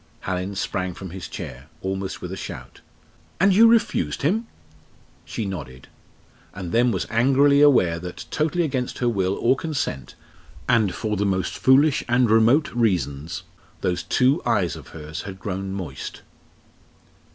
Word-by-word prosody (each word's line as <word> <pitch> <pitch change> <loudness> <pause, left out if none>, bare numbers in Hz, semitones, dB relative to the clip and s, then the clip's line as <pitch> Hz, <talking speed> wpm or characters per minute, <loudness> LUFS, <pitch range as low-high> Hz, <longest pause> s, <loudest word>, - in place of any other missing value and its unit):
Hallin 95 +1 -3
sprang 95 -2 -2
from 95 -3 -8
his 95 0 -7
chair, 65 +4 -8
almost 95 0 -4
with 90 - -5
a - - -4
shout. - - -8 0.6
"And 195 0 +5
you 225 +4 +7
refused 140 - +2
him?" 215 +10 +1 0.8
She 110 - -4
nodded, 65 -10 -7 0.7
and 90 -3 -6
then 120 +2 +3
was 95 - -1
angrily 135 +5 +4
aware 90 - +5
that, 90 +1 -7
totally 160 +3 +1
against 130 -5 -2
her 125 - 0
will 95 -4 +1
or 125 +3 +3
consent, 145 - -4 0.5
and 110 -5 +2
for 110 -2 -2
the 105 +1 0
most 95 -3 -1
foolish 140 +2 +4
and 120 -2 +3
remote 115 +7 +4
reasons, 85 - -1 0.4
those 90 -1 0
two 135 +6 +2
eyes 100 -8 +1
of - - -11
hers 75 -1 -7
had 95 -1 -8
grown 95 -1 -4
moist. 90 -9 -6
100 Hz, 150 wpm, -23 LUFS, 90-130 Hz, 0.8 s, you